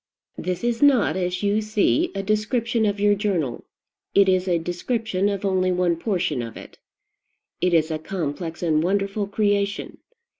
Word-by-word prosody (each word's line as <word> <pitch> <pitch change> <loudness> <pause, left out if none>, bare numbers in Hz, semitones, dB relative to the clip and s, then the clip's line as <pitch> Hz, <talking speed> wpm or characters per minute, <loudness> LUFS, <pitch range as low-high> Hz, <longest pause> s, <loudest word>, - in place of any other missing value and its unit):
This 180 +3 -3
is 235 -1 0
not, 275 -9 +4
as 180 +1 -2
you 205 +1 +2
see, 215 - +1
a 195 - -2
description 220 +2 0
of 205 0 -1
your 205 0 +4
journal: 185 - -1 0.5
it 200 -1 +6
is 185 0 +2
a 175 -2 +2
description 195 +4 -1
of 200 0 -3
only 185 -1 +1
one 180 -1 +1
portion 175 - -1
of 115 -1 -7
it. - - -12 0.8
It 180 - +2
is 160 -1 +2
a 155 - -2
complex 165 0 -4
and 155 -2 +2
wonderful 200 +3 0
creation. 205 -1 -1
195 Hz, 160 wpm, -23 LUFS, 175-210 Hz, 0.8 s, it